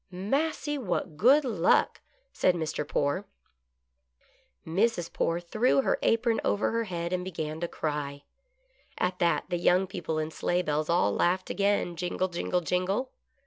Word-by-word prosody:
" - - -49 0.2
Massy, 295 0 0
what 180 - -2
good 270 - +5
luck! 195 -9 +2 0.2
" - - -42
said 180 - +2
Mr. 155 -3 -3
Poore. 145 +9 -1 1.4
Mrs. 175 +1 0
Poore 165 +1 0
threw 220 +10 +2
her - - +1
apron 230 0 +2
over 205 - +1
her 230 0 0
head 170 -2 -3
and 180 0 -1
began 160 -4 -4
to 170 - -2
cry. 145 -3 -4 0.7
At 180 0 -1
that, 170 -2 +2
the 175 - 0
young 180 +2 +3
people 175 -4 -4
in 155 0 -2
sleigh 175 +2 0
bells 150 0 -1
all 170 - +3
laughed 185 - +1
again, 200 -3 +1
jingle, 180 +2 -2
jingle, 180 +1 -1
jingle! 185 - -1
180 Hz, 155 wpm, -28 LUFS, 165-205 Hz, 1.4 s, good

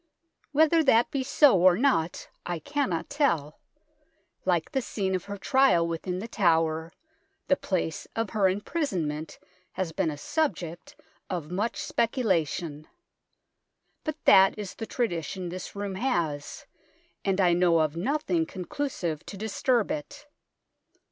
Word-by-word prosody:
Whether 315 +2 +4
that 235 -3 +4
be 275 - -1
so 265 - +5
or 180 -1 +6
not 200 - +1 0.2
I 175 -1 -3
cannot 275 - -2
tell; 170 - 0 0.9
like - - +1
the 270 -3 0
scene 195 -5 -2
of 185 -2 -2
her 200 0 -6
trial 195 -7 +3
within 170 +2 -3
The 205 +5 -5
Tower, 165 -5 +1 0.6
the 280 - +4
place 180 - -2
of 225 -2 -2
her 200 -4 +3
imprisonment 185 - -2 0.4
has 185 -3 -2
been 175 0 0
a 150 - -5
subject 175 - -3 0.3
of 170 -3 -4
much 205 +6 -1
speculation; 170 - -1 1.2
but 310 -2 -3
that 195 0 +7
is 205 -3 -5
the 225 - -7
tradition 180 - -2
this 180 +3 -7
room 200 -1 -3
has, 170 - -2 0.6
and 195 0 0
I 180 -2 +4
know 175 -1 +4
of 155 -1 +1
nothing 305 - 0
conclusive 180 - -4
to 200 - -7
disturb 220 +2 0
it. 150 - -6
190 Hz, 135 wpm, -27 LUFS, 165-250 Hz, 1.2 s, that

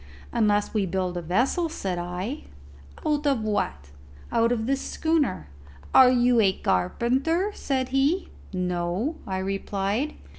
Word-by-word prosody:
"Unless 210 -3 +1
we 205 -3 +1
build 185 0 -2
a 175 - -2
vessel," 250 - +1
said 190 - -3
I. 180 - -4 0.6
"Out 295 -1 +1
of 265 -6 +1
what?" 75 - -2 0.4
"Out 230 +1 +3
of 225 -2 0
this 270 +2 0
schooner." 310 - 0 0.5
"Are 260 -1 +8
you 245 -1 +4
a 195 -3 +4
carpenter?" 260 - 0
said 260 -7 -2
he. 280 +8 +1 0.2
"No," 180 - -1
I 190 -1 -2
replied. 195 +7 -2
225 Hz, 135 wpm, -25 LUFS, 185-270 Hz, 0.6 s, Are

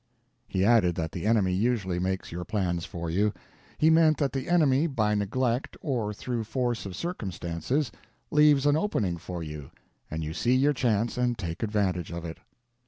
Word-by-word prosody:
He 95 0 0
added 105 -7 +4
that 80 -2 -3
the 90 +3 -3
enemy 105 -5 +3
usually 100 -3 0
makes 95 +1 -2
your 90 +1 -4
plans 90 -4 -1
for 85 -1 -5
you. 105 +5 +2 0.5
He 160 +1 +4
meant 160 -1 +5
that 140 -4 0
the 135 +2 -3
enemy 155 -3 +4
by 110 -8 +1
neglect 120 +5 -1
or 120 -8 -1
through 115 +2 -3
force 120 -1 -2
of 95 - -7
circumstances 115 - -2 0.4
leaves 150 -2 +5
an 145 0 +4
opening 110 - 0
for 85 0 -6
you, 75 -3 -7 0.4
and 80 +1 -3
you 80 +1 -4
see 120 +8 +2
your 140 +3 +3
chance 120 -2 0
and 120 -1 +1
take 85 -2 -5
advantage 100 -6 0
of 85 0 -5
it. 80 -1 -7
105 Hz, 175 wpm, -27 LUFS, 90-130 Hz, 0.5 s, meant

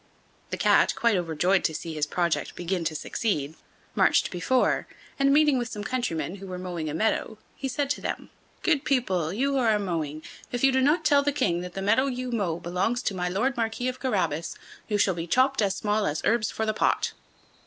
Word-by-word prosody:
The - - -3
Cat, - - +4
quite 235 -3 +2
overjoyed 180 +2 +1
to 160 - 0
see 165 +1 -5
his 150 -1 -1
project 170 +1 -1
begin 175 0 -2
to 155 0 -1
succeed, 155 -5 -2 0.4
marched - - +3
on - - -20
before, 245 +8 +1 0.3
and, 275 0 +4
meeting 295 -2 +4
with 240 - -2
some 210 -2 -6
countrymen, 205 -7 -2
who 195 0 -9
were 185 -1 -5
mowing 175 -4 -4
a - - -4
meadow, 220 +2 0 0.2
he 270 - -4
said 275 +2 -1
to - - -2
them: - - -4 0.3
"Good 300 -5 +2
people, 190 - 0
you 265 +8 0
who 275 - +1
are 225 -4 +3
mowing, 160 -6 -3 0.3
if 245 0 -3
you 270 - +6
do 265 0 +2
not 295 +6 +2
tell 285 -2 +5
the 290 +1 +1
King 195 -12 0
that 180 0 -7
the 195 - -3
meadow 225 +7 +3
you 255 -1 -3
mow 190 -8 -1
belongs 185 +9 -1
to - - -1
my 180 -1 -2
Lord 240 +8 0
Marquis 230 +2 -1
of 255 0 -6
Carabas, 185 - -1 0.3
you 210 - 0
shall 195 -2 +3
be 170 0 -5
chopped 260 +6 +3
as 195 -2 +1
small 210 0 0
as 150 +1 -2
herbs 225 -2 +2
for 220 - -2
the 215 - 0
pot." - - +1
210 Hz, 215 wpm, -26 LUFS, 175-255 Hz, 0.4 s, you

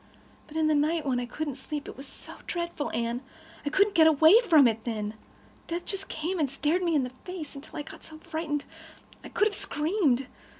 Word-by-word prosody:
But 310 - -7
in 320 - +3
the 310 - +4
night, 305 +2 +2
when 255 -3 +1
I 245 - -3
couldn't 290 +1 -4
sleep—it 290 +2 -6
was 275 +2 -9
so - - -10
dreadful, 340 -4 -2
Anne. 235 +1 -1 0.4
I 290 - -1
couldn't 400 +6 +3
get 320 -3 +7
away 320 +8 +7
from 300 -6 +8
it 225 -1 -1
then. 215 -3 -3 0.5
Death 340 +1 -3
just 390 -2 -3
came 335 +4 -3
and 290 -3 +2
stared 295 +6 0
me 340 -3 +1
in 285 - +3
the 250 - -4
face, 310 +4 -8
until 275 0 -10
I 295 - -3
got - - -12
so 315 - -11
frightened 315 -2 -3 0.6
I - - -8
could 420 - +2
have 420 - -3
screamed. 300 - +1
305 Hz, 210 wpm, -28 LUFS, 275-335 Hz, 0.6 s, from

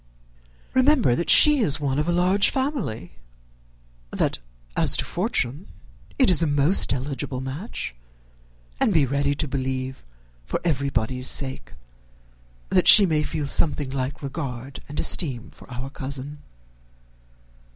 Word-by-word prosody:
Remember 260 - +3
that 170 - -3
she 300 -1 +8
is 155 - +1
one 140 -1 -2
of 150 +3 -2
a - - +2
large 180 +3 +2
family; 210 - -4 0.9
that - - -2 0.4
as - - +2
to - - -1
fortune 140 +11 -3 0.5
it 260 - +3
is 175 -3 +4
a 165 - +2
most 145 +6 +2
eligible 135 0 -4
match; 135 - -6 0.9
and 205 - +1
be 150 -3 +4
ready 140 +2 -1
to 150 - -2
believe, 130 -1 -4 0.4
for - - -4
everybody's 130 -5 -2
sake, 130 -2 -2 1.0
that - - +2
she 205 - +10
may 155 -4 0
feel 150 -1 -4
something 145 -1 +1
like 135 +2 -5
regard 135 -2 -7
and 145 - -6
esteem 130 -9 -1
for - - -17
our 130 +2 -7
cousin." 140 +1 -6
140 Hz, 130 wpm, -23 LUFS, 130-170 Hz, 1.0 s, she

